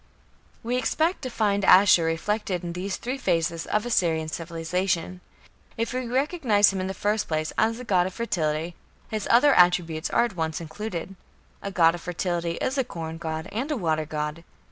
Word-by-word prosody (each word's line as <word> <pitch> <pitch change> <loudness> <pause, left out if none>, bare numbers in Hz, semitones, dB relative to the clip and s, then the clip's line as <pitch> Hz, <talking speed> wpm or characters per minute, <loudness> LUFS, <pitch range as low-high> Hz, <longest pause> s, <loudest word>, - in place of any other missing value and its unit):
" - - -34
We 245 +2 -1
expect 320 +7 0
to 260 - -4
find 205 -4 0
Ashur 185 -3 +6
reflected 180 +3 -1
in 170 -1 -4
these 185 +3 -3
three 255 +3 -4
phases 165 - 0
of 210 +1 0
Assyrian 165 -9 +1
civilization. 170 +2 -2 0.6
If 230 +1 -2
we 255 -1 -2
recognize 250 - +2
him 190 - -2
in 185 - -2
the 190 - -4
first 210 +3 0
place 155 0 -2
as 225 +2 +1
a - - -6
god 185 -6 +2
of 190 - -7
fertility, 165 -7 -1 0.4
his 215 -2 -3
other 280 +5 +6
attributes 175 -3 +3
are 235 - +3
at 225 -5 -6
once 160 -2 -2
included. 175 +2 -6 0.5
A 200 - -4
god 165 -4 +4
of 175 - -7
fertility 175 -1 -2
is 265 +10 -2
a - - +3
corn 165 -6 -7
god 160 +1 -4
and 250 +7 -3
a 300 - -1
water 155 -5 -1
god. 150 +1 -4
185 Hz, 190 wpm, -25 LUFS, 165-225 Hz, 0.6 s, Ashur